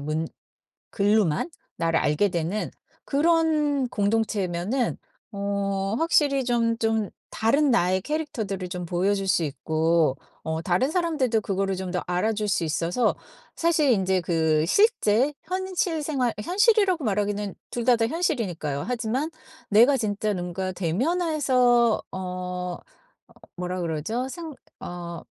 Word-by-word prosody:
문 155 +3 -2 0.6
글로만 205 - +2 0.3
나를 165 -1 +1
알게 165 +7 +2
되는 175 +5 -2 0.4
그런 300 -3 +2
공동체면은 210 0 0 0.3
어 200 0 -1
확실히 290 -5 +3
좀 230 -2 +1
좀 225 -2 0 0.2
다른 275 +6 +2
나의 185 -3 +2
캐릭터들을 220 - -3
좀 180 -1 -4
보여줄 195 +3 0
수 170 - +3
있고 155 +1 +1 0.3
어 160 +1 -2
다른 185 - +1
사람들도 300 - +1
그거를 195 -1 -1
좀 185 -1 -4
더 180 - -1
알아줄 210 +4 0
수 180 - +1
있어서 165 +8 +1 0.4
사실 320 -5 +2
인제 190 -3 +2
그 160 -2 +1
실제 290 - +3
현실 365 -2 -1
생활 265 -6 0
현실이라고 390 - +3
말하기는 205 -1 -1 0.2
둘 240 -1 -3
다 250 - +5
다 225 0 +1
현실이니까요. 200 - -1
하지만 250 +5 -1 0.4
내가 240 +7 +6
진짜 210 -3 -1
뭔가 180 +1 -3
대면해서 250 - +2
어 180 -1 -4 0.8
뭐라 180 0 -3
그러죠? 170 - -2
생 320 +1 -7 0.3
어 170 -1 -7
210 Hz, 255 characters per minute, -25 LUFS, 180-270 Hz, 0.8 s, 내가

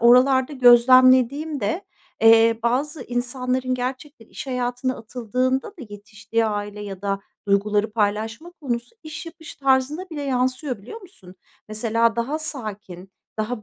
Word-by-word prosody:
oralarda 260 +3 +5
gözlemlediğimde, 255 - +4 0.4
eee, 225 0 +6
bazı 265 +4 -1
insanların 250 +1 -2
gerçekten 255 0 -6
iş - - -9
hayatına 250 0 -2
atıldığında 250 +3 -2
da 370 -9 -12
yetiştiği 215 +2 -3
aile 205 0 -4
ya 195 -2 -7
da 200 0 -1 0.3
duyguları 205 +2 +1
paylaşma 220 +8 -2
konusu 245 - -4
iş 315 +1 -8
yapış 325 -1 -11
tarzına 275 +6 0
bile 295 -2 -5
yansıyor, 255 -1 -1
biliyor 445 - -9
musun? 275 - -16 0.3
Mesela 225 +1 +1
daha 255 +7 -1
sakin, 210 - -6 0.3
daha, 215 +1 -3
245 Hz, 125 wpm, -22 LUFS, 220-270 Hz, 0.4 s, eee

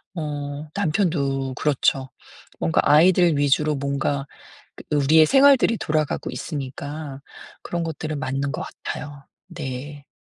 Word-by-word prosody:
어 145 -2 -5
남편도 150 -8 0
그렇죠. 135 -2 +1 0.5
뭔가 80 - +2
아이들 170 +1 +5
위주로 145 +2 +2
뭔가 140 0 -1 0.7
우리의 150 +2 +5
생활들이 270 - +5
돌아가고 155 -4 -1
있으니까 140 0 -6 0.4
그런 170 -1 -3
것들은 155 -1 -4
맞는 135 +1 -2
것 155 - -4
같아요. 145 -2 -7 0.2
네. 145 -3 -7
145 Hz, 260 characters per minute, -23 LUFS, 140-160 Hz, 0.7 s, 아이들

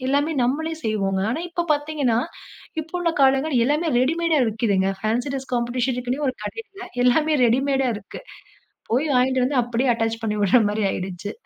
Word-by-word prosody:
எல்லாமே 290 +3 +1
நம்மளே 315 +6 -1
செய்வோங்க. 195 -3 0
ஆனா 320 +8 -2
இப்ப 345 0 -2
பாத்தீங்கன்னா, 290 -6 0 0.6
இப்போ 325 - -18
உள்ள 340 -1 +1
காலங்கள் 270 +2 +3
எல்லாமே 305 +3 +1
ரெடிமேடா 325 +2 +2
விக்குதுங்க. 200 -3 +1
ஃபேன்ஸி 235 +6 -1
டிரஸ் 265 -1 -6
காம்பெடிஷன்னே 245 +2 -1
ஒரு 255 - -2
கடைல 390 - -8 0.2
எல்லாமே 305 +5 +3
ரெடிமேடா 270 +2 +1
இருக்கு. 200 - -10 0.7
போய் 285 +6 +1
வாங்கிட்டு 255 0 +3
வந்து 265 -2 +2
அப்படியே 240 +2 0
அட்டாச் 225 0 -2
பண்ணி 210 -1 -1
உட்ற 235 +5 +5
மாதிரி 210 0 -1
ஆயிடுச்சு. 185 +2 -5
255 Hz, 150 wpm, -22 LUFS, 225-300 Hz, 0.7 s, உட்ற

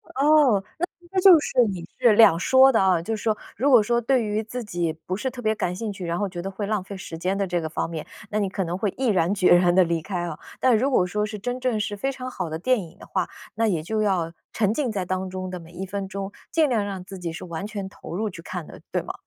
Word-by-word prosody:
哦， 275 -7 +5 0.2
那 355 - 0
其 350 - -20
实 375 - +3
就 365 -3 +9
是 250 -4 +3
你 175 -3 -6
是 240 -4 +6
两 210 -6 +7
说 260 +8 +6
的 225 - +3
啊， 185 -3 +3
就 225 +6 -2
是 210 - -8
说， 220 -2 +1 0.2
如 275 +7 +2
果 245 -5 +7
说 235 +3 +1
对 245 0 +2
于 210 +1 -1
自 240 +2 -6
己 175 -5 -1
不 175 +4 -5
是 260 +6 -2
特 245 -1 -9
别 220 -1 +2
感 180 -4 -2
兴 210 +2 -4
趣， 190 -3 -6
然 170 +1 -1
后 205 - 0
觉 180 -2 -6
得 195 - -4
会 200 +1 -4
浪 210 -2 0
费 195 +2 -8
时 170 -3 -8
间 185 +3 -1
的 200 0 0
这 175 -1 -1
个 160 - -3
方 155 - -2
面， 160 -2 -6 0.2
那 215 - 0
你 200 -2 +1
可 190 0 -2
能 170 +1 -3
会 200 -1 -1
毅 265 - -1
然 185 -2 +2
决 185 -3 +5
然 175 0 +4
地 185 0 +6
离 170 -1 -1
开 180 -1 -3
啊。 170 -3 -5 0.2
但 255 -3 +5
如 260 +6 +1
果 185 -9 +3
说 210 +3 -1
是 215 0 -6
真 245 +5 -3
正 250 -4 0
是 205 0 -2
非 270 +7 -1
常 255 -1 -6
好 185 -8 -4
的 160 0 -4
电 250 +7 +2
影 175 0 -11
的 - - -12
话， 185 -2 -1 0.3
那 225 +1 +1
也 175 -7 0
就 215 +7 -2
要 180 -5 0 0.2
沉 210 -2 +1
浸 255 +1 -1
在 200 -4 -2
当 185 +1 -2
中 185 0 -5
的 180 -1 -6
每 165 0 -14
一 185 +2 -5
分 195 0 -4
钟， 195 0 -5 0.2
尽 320 -2 +3
量 225 -5 +1
让 195 -2 -5
自 190 0 -9
己 170 -2 -4
是 165 - -7
完 170 +2 -5
全 205 -3 -5
投 190 - -10
入 215 +2 -1
去 180 - -10
看 175 -1 -6
的， - - -12
对 - - -1
吗？ - - -5
200 Hz, 315 characters per minute, -24 LUFS, 180-225 Hz, 0.3 s, 就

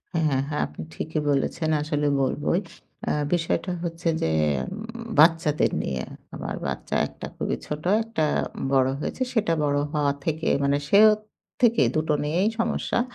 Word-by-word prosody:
হ্যাঁ, 160 - +2
হ্যাঁ, 135 -1 +1
হ্যাঁ। 150 - -1
আপনি 75 +1 -10
ঠিকই 155 - -3
বলেছেন 145 +3 0
আসলে 150 -1 0
বলবই। 145 +6 +1 0.5
আ - - +2 0.2
বিষয়টা 175 +2 0
হচ্ছে 170 0 -4
যে - - +1 0.4
উম 215 - -6 0.4
বাচ্চাদের 160 -1 +4
নিয়ে। 65 -2 -3 0.3
আমার - - -4
বাচ্চা - - -3
একটা - - -9
খুবই - - -2
ছোট, 150 0 -5 0.2
একটা 225 -8 -2 0.5
বড় 130 -1 +4
হয়েছে। 260 - -4
সেটা 210 -8 +2
বড় 145 -1 +1 0.2
হওয়া 145 -2 +2
থেকে 160 0 -1 0.2
মানে 140 0 +3
সে - - +6 0.6
থেকে 230 -1 +5
দুটো 155 0 +1
নিয়েই 175 +8 +1
সমস্যা। 230 +1 0
155 Hz, 150 wpm, -25 LUFS, 145-170 Hz, 0.6 s, সে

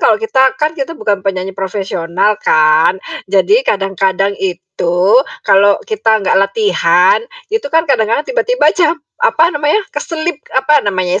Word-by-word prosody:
kalau - - +3
kita, 440 -12 0
kan 305 +3 -1
kita 320 0 -5
bukan 200 -2 -1
penyanyi 190 0 -3
profesional 190 0 -2
kan. 155 +4 +3 0.3
Jadi 300 - +3
kadang-kadang 195 0 0
itu, 180 -1 -3 0.5
kalau 200 +1 +4
kita 225 - 0
nggak - - +1
latihan, 190 -3 +2 0.3
itu 445 -8 -1
kan 325 +2 +1
kadang-kadang, 230 -2 0
tiba-tiba - - +1
ca 345 -4 +2 0.3
apa 480 -9 +3
namanya, 300 +8 0
keselip, 330 -2 -4 0.2
apa 295 +3 +3
namanya 185 -1 -1
200 Hz, 135 wpm, -13 LUFS, 190-310 Hz, 0.5 s, kalau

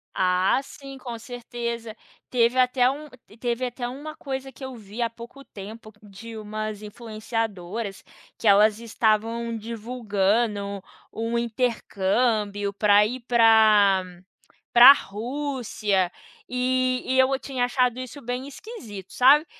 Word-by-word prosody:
Ah 185 +5 +2
sim, 275 -1 -11
com 240 -3 -7
certeza, 235 -1 -6 0.3
teve 240 0 +2
até 250 0 +4
um 295 +3 -5 0.3
teve 245 +1 -1
até 245 0 -4
uma 290 +5 -7
coisa 270 -3 -5
que 265 - -13
eu 260 -1 -7
vi 215 +1 -8
há 230 - +1
pouco 235 +4 -12
tempo 215 +2 -10
de 220 +3 -11
umas 215 0 -5
influenciadoras, 215 -2 -5 0.3
que 225 - -2
elas 210 +2 +5
estavam 230 +1 0
divulgando 210 -3 -1 0.3
um 230 +1 -2
intercâmbio 215 -3 0
pra 205 0 +5
ir 250 +4 -4
pra 215 -4 +5 0.7
pra 245 +3 +11
Rússia, 225 -6 -2 0.4
e 255 0 0
e 260 0 +1
eu 265 +1 +4
tinha 260 -3 -1
achado 250 0 +1
isso 255 +3 -8
bem 250 +2 -4
esquisito, 235 - -10
sabe. 280 +5 +6
230 Hz, 120 wpm, -25 LUFS, 210-255 Hz, 0.7 s, pra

